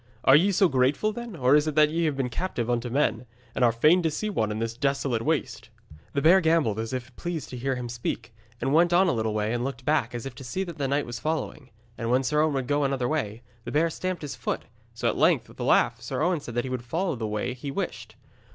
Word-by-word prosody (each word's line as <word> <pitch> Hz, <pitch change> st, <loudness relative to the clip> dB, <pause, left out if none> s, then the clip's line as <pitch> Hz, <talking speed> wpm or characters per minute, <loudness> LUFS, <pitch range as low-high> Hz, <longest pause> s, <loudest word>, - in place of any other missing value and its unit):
Are 135 Hz, -, +7 dB
ye 185 Hz, +7 st, +5 dB
so 190 Hz, 0 st, +4 dB
grateful, 135 Hz, +9 st, +2 dB
then, 235 Hz, -3 st, -7 dB
or 130 Hz, -2 st, +4 dB
is 150 Hz, +1 st, +3 dB
it 155 Hz, -, -2 dB
that 150 Hz, -1 st, +5 dB
ye 165 Hz, +1 st, 0 dB
have 150 Hz, -3 st, 0 dB
been 135 Hz, -2 st, 0 dB
captive 125 Hz, -6 st, -2 dB
unto 120 Hz, 0 st, -1 dB
men, 125 Hz, -2 st, 0 dB, 0.3 s
and -, -, 0 dB
are 120 Hz, -, +5 dB
fain 155 Hz, +10 st, +4 dB
to 165 Hz, -, +1 dB
see 210 Hz, +8 st, -3 dB
one 110 Hz, -, 0 dB
in 105 Hz, -, -3 dB
this 115 Hz, +1 st, -3 dB
desolate 135 Hz, -3 st, 0 dB
waste?' 150 Hz, 0 st, -2 dB, 0.4 s
The 140 Hz, -, 0 dB
bear 185 Hz, +4 st, +7 dB
gambolled 160 Hz, -, +2 dB
as 115 Hz, 0 st, -3 dB
if 130 Hz, -1 st, -5 dB
pleased 170 Hz, -3 st, -4 dB
to -, -, -6 dB
hear 135 Hz, +2 st, -1 dB
him 125 Hz, -1 st, -4 dB
speak, 120 Hz, -1 st, -4 dB, 0.3 s
and 135 Hz, +3 st, 0 dB
went 170 Hz, +2 st, +4 dB
on 185 Hz, +2 st, +5 dB
a -, -, +3 dB
little 110 Hz, -4 st, -1 dB
way 105 Hz, +1 st, 0 dB
and 120 Hz, 0 st, -1 dB
looked 130 Hz, -1 st, -5 dB
back 135 Hz, -6 st, +1 dB
as 120 Hz, -, -5 dB
if 135 Hz, -, -6 dB
to 135 Hz, +2 st, -11 dB
see 185 Hz, +10 st, -3 dB
that 170 Hz, -5 st, -8 dB
the 140 Hz, -, 0 dB
knight 140 Hz, +2 st, 0 dB
was 120 Hz, 0 st, -6 dB
following. 155 Hz, -2 st, -3 dB, 0.3 s
And 115 Hz, -1 st, -2 dB
when 130 Hz, +2 st, +3 dB
Sir 150 Hz, +3 st, +2 dB
Owen 155 Hz, -2 st, +1 dB
would 135 Hz, -2 st, -1 dB
go 145 Hz, +2 st, +1 dB
another 135 Hz, -3 st, 0 dB
way, 120 Hz, -7 st, -2 dB, 0.2 s
the 120 Hz, -, -6 dB
bear 160 Hz, +4 st, +2 dB
stamped 185 Hz, 0 st, -4 dB
his 145 Hz, -, -5 dB
foot, -, -, -3 dB, 0.3 s
so -, -, -5 dB
that -, -, +4 dB
at -, -, -6 dB
length, -, -, +3 dB
with -, -, -17 dB
a -, -, -2 dB
laugh, 115 Hz, 0 st, +3 dB
Sir 130 Hz, +4 st, -2 dB
Owen 175 Hz, -1 st, +2 dB
said 120 Hz, -4 st, -8 dB
he -, -, -5 dB
would 130 Hz, -2 st, -2 dB
follow 165 Hz, +6 st, -1 dB
the 115 Hz, -2 st, -3 dB
way 105 Hz, +4 st, -2 dB
he 130 Hz, +3 st, -7 dB
wished. 135 Hz, -, -5 dB
135 Hz, 270 wpm, -26 LUFS, 120-160 Hz, 0.4 s, Are